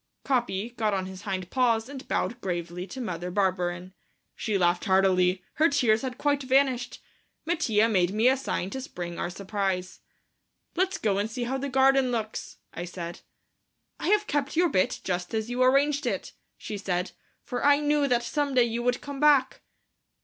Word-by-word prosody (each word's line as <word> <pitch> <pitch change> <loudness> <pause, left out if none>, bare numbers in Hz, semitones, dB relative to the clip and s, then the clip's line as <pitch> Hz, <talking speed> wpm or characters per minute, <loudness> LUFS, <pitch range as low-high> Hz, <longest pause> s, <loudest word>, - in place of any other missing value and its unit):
Capi 240 -5 0
got 220 -4 0
on 190 -1 -2
his 185 0 -8
hind 185 -3 -4
paws 235 -3 +2
and 275 -1 -9
bowed 240 +1 -1
gravely 175 0 -4
to 260 - -8
Mother 180 -7 -4
Barberin. 180 -1 -1 0.4
She 215 -3 -1
laughed 175 0 +2
heartily. 185 -2 +3
Her 320 +2 +5
tears 240 -6 +3
had 255 -2 -4
quite 290 -1 +1
vanished. 260 -2 +1 0.4
Mattia 225 -10 +2
made 185 -5 +2
me 220 +4 +2
a 260 - +5
sign 230 -8 -3
to 265 - -4
spring 175 -8 -6
our - - -2
surprise. 190 -1 -3 0.8
"Let's 375 +2 +1
go 200 -3 0
and 205 +2 -1
see 240 +2 -4
how 265 +3 -2
the 280 +1 -3
garden 265 0 +4
looks," 220 -2 -4 0.2
I 175 - -5
said. 175 -1 -7 0.8
"I - - -3
have 420 +2 +3
kept 290 -2 -1
your 345 +1 +3
bit 185 -7 +1
just 180 +2 -2
as 220 +2 -2
you 245 +1 -1
arranged 275 +2 +3
it," - - -3 0.2
she 210 - -6
said, 180 -2 -2 0.3
"for 245 - -4
I 285 0 +5
knew 295 -1 +2
that 240 -2 +2
some 280 +3 -1
day 250 - +6
you 235 0 -2
would 245 +1 0
come 285 -1 -7
back." 290 -3 +4
230 Hz, 180 wpm, -27 LUFS, 185-270 Hz, 0.8 s, day